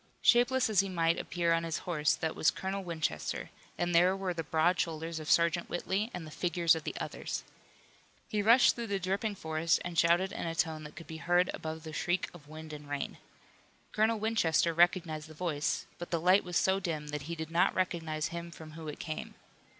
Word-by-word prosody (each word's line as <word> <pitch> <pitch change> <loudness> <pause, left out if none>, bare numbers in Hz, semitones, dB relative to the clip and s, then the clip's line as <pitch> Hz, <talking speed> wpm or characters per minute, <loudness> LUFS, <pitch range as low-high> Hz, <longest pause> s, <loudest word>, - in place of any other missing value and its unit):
Shapeless 250 +2 +5
as 215 -4 +2
he 195 0 +3
might 165 -2 +1
appear 170 -1 0
on 165 0 +1
his 165 -1 -2
horse 155 -4 +2
that 160 -1 -3
was 155 - +4
Colonel 195 +1 -3
Winchester, 160 - -3 0.3
and 175 0 0
there 180 +3 +5
were 190 -2 -2
the 165 - -3
broad 165 +3 +2
shoulders 165 0 -2
of 155 - -6
Sergeant 170 0 +3
Whitley 195 +5 -1
and 175 -6 -6
the 155 - -10
figures 170 0 +2
of 160 -2 -4
the - - -4
others. - - -4 0.8
He 210 -3 0
rushed 230 +5 +6
through 235 -1 -5
the 200 -1 0
dripping 195 +3 -1
forest 160 0 +1
and 175 -1 -1
shouted 175 +3 +3
in 170 - -4
a 165 - -3
tone 160 -2 -1
that 150 - -10
could 165 - -9
be 160 +1 -7
heard 175 +2 +2
above 160 0 -5
the 160 -1 -8
shriek 175 +3 -1
of 155 -4 -14
wind 155 0 -9
and 150 -1 -9
rain. 145 -1 -4 0.7
Colonel 220 +1 +2
Winchester 190 -7 +2
recognized 170 -2 +2
the 155 - -13
voice, 155 -3 -1
but 175 - -6
the 170 - 0
light 185 +4 +5
was 180 -1 -1
so 190 +1 +3
dim 155 -5 -3
that 150 +1 -5
he 170 - -2
did 160 0 -6
not 175 +3 +3
recognize 165 -4 -1
him 170 0 -6
from 160 -2 -11
whom 160 0 -7
it 150 - -7
came. 155 -2 -5
170 Hz, 210 wpm, -31 LUFS, 160-185 Hz, 0.8 s, rushed